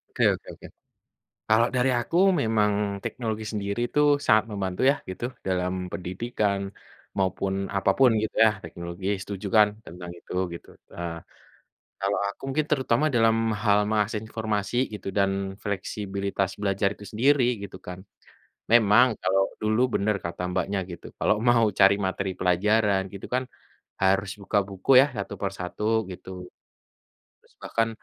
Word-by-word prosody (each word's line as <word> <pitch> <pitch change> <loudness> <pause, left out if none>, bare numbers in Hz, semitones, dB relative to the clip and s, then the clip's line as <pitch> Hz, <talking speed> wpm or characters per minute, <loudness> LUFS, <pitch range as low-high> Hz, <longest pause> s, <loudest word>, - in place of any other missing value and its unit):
Oke - - +1
oke - - -17
oke. - - -12 0.8
Kalau 115 +2 +4
dari 125 +1 +3
aku 140 +8 -3 0.2
memang 110 -3 +2 0.3
teknologi 110 -3 -3
sendiri 100 +1 -3
tuh 145 -1 +4
sangat 110 0 +5
membantu 95 -2 -3
ya 140 - +1
gitu 95 +5 -6 0.2
dalam 90 -1 0 0.2
pendidikan, 100 +2 -2 0.6
maupun 95 0 0 0.2
apa 95 0 +2
pun 130 -2 +6
gitu 110 - -4
ya 110 - +6
teknologi 85 +3 -7 0.2
setuju 100 0 -6
kan? 105 -1 +7 0.2
Tentang 90 +1 -9
itu 90 - -10 0.2
gitu, 85 - -11 0.2
eee, 85 -1 -5 0.8
kalau 100 +1 0
aku 100 - -7
mungkin 155 +3 0
terutama 135 -1 +2
dalam 115 -1 +4 0.3
hal 105 -1 +4
mengakses 105 0 0
informasi 110 -1 -2 0.2
gitu 105 - -7
dan 100 -1 +3 0.3
fleksibilitas 100 -1 -2
belajar 100 0 +1
itu 105 - -12
sendiri 130 +5 +3 0.2
gitu 95 -1 -8
kan, 90 0 -6 0.7
memang 115 +1 +6
kalau 95 +1 +2 0.2
dulu 110 +3 +1
benar 105 +1 +1
kata 85 +1 -5
Mbaknya 95 +2 -1
gitu 85 - -10
kalau - - +3
mau 120 0 +4 0.2
cari 100 0 +7
materi 95 -1 -2
pelajaran 100 +2 +2
gitu 100 - -8
kan 125 +1 +1 0.6
harus 95 +1 +2
buka 100 +1 0
buku 95 +4 -5
ya? - - +3
Satu 100 - -4
per 100 - -1
satu, 90 +3 -6 0.3
gitu. 90 0 -9 1.1
Terus - - -28
bahkan, 115 0 0
100 Hz, 145 wpm, -26 LUFS, 95-110 Hz, 1.1 s, kan